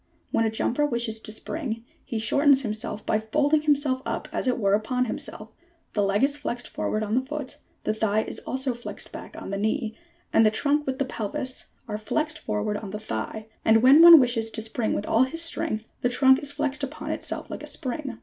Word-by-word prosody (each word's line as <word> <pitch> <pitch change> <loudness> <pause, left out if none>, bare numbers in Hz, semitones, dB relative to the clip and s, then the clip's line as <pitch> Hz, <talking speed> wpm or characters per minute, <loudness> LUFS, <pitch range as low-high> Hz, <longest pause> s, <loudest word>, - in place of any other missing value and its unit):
When 225 - +2
a - - +2
jumper 235 +5 0
wishes 235 -5 0
to 215 - -6
spring, 230 -1 -4 0.2
he 230 - -4
shortens 275 +5 +4
himself 215 -1 -4
by 215 - +2
folding 290 +7 +2
himself 285 -3 +2
up - - -3
as - - -2
it 250 - +2
were 200 -4 +2
upon 250 +4 +1
himself; 215 -1 -5 0.4
the 210 - +1
leg 200 +3 +2
is 285 +1 +3
flexed 245 -4 -4
forward 215 - -2
on 215 0 -3
the 250 - +3
foot, 285 0 -6 0.2
the 215 - 0
thigh 220 0 +1
is - - -5
also 265 0 -2
flexed 240 +1 -8
back - - -9
on - - -7
the 200 - -2
leg, 220 +2 -1 0.4
and 225 - +6
the 215 - +6
trunk 290 +6 +1
with 260 -1 -1
the 275 - 0
pelvis 255 +2 -4 0.2
are 210 -1 -4
flexed 305 +7 -1
forward 210 -3 -2
on 205 -1 -7
the 210 +2 -5
thigh; 215 - -5 0.2
and, 225 +1 +4
when 275 +5 +8
one 335 -1 +11
wishes 235 -3 +1
to 220 - -4
spring 225 0 -1
with 205 - -2
all 225 - +3
his 330 +6 -3
strength, 220 -9 -2 0.2
the 245 - +2
trunk 265 +1 +5
is 285 - -2
flexed 290 0 -2
upon 280 +2 -4
itself - - -3
like - - -6
a - - -7
spring. 255 -1 -4
240 Hz, 215 wpm, -26 LUFS, 215-280 Hz, 0.4 s, one